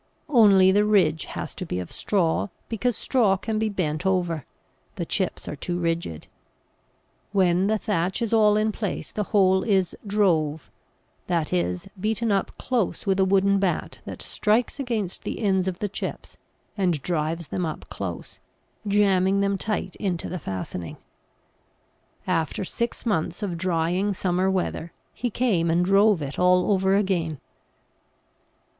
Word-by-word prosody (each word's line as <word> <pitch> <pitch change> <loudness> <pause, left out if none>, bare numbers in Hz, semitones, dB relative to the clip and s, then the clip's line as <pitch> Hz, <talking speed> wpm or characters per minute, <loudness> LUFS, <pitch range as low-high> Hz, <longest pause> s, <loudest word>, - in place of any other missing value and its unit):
Only 200 -8 +6
the 205 +2 +4
ridge 185 -7 +3
has - - -5
to 190 - -6
be 90 - -3
of 90 - -6
straw, 180 -4 +1 0.2
because 230 +1 -1
straw 220 -7 +2
can 215 +2 -2
be 220 0 +1
bent 155 -6 -2
over; 175 -6 0 0.5
the - - -3
chips - - -2
are - - -4
too 175 - -3
rigid. 165 - -2 1.1
When 185 -1 +3
the 220 +1 +2
thatch 190 -3 -1
is 230 -2 -1
all 210 -2 +5
in 215 +1 +1
place 210 -2 -4
the 210 - -2
whole 190 -2 +3
is 190 -5 +1
"drove," 165 -7 +1 0.6
that 170 -3 0
is, 90 0 -1
beaten 220 +2 0
up 195 -1 -1
close 240 -7 -1
with 195 -1 +1
a 190 - +5
wooden 195 +1 +3
bat 190 -3 -1
that - - -7
strikes 225 +6 0
against 225 -8 -2
the - - -5
ends 190 -3 +1
of 185 -2 -2
the 205 - -2
chips 200 - -6 0.4
and 180 -6 +1
drives 165 -2 -2
them 180 - -2
up 155 -2 -5
close, 90 -4 -6 0.5
jamming 200 -1 +3
them 200 0 +1
tight 195 -1 -3
into 185 -5 -2
the 180 - -4
fastening. 90 - -5 1.3
After 165 -1 -1
six 235 +6 -3
months 180 -2 -1
of 185 -4 -2
drying 180 +3 0
summer 185 +1 +1
weather 175 -2 -2 0.2
he 245 - -2
came 205 -8 +1
and 170 +2 +2
drove 195 -2 +4
it 140 0 -5
all 180 +2 +4
over 190 0 +3
again. 175 -7 0
190 Hz, 150 wpm, -25 LUFS, 170-205 Hz, 1.3 s, Only